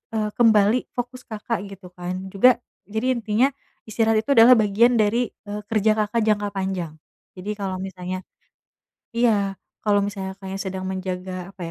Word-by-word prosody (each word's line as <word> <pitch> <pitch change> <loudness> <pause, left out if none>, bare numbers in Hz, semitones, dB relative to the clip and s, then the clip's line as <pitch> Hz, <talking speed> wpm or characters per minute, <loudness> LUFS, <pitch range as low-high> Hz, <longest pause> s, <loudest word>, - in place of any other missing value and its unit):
eee, 215 -1 0
kembali 220 0 +4
fokus 245 +1 -5
Kakak, 220 +1 -3
gitu 195 -2 -12
kan 185 +1 -6
juga 245 +6 +6 0.3
jadi 220 +5 0
intinya 230 +5 +2 0.3
istirahat 220 0 +1
itu 280 - -2
adalah 250 -1 +8
bagian 225 +3 +4
dari, 230 +2 +2 0.2
eee, 210 0 -5
kerja 220 -1 +2 0.2
Kakak, 225 +2 0
jangka 210 -1 +1
panjang, 190 -5 -3 0.4
jadi 190 +3 -5
kalau 190 -2 -2
misalnya, 185 -1 -5 0.9
iya 205 -5 +2 0.2
kalau 205 -1 +2
misalnya 195 -2 -5
Kakaknya, 195 0 -6
sedang 190 -1 -4
menjaga 185 -1 -4
apa - - -17
205 Hz, 150 wpm, -23 LUFS, 190-225 Hz, 0.9 s, adalah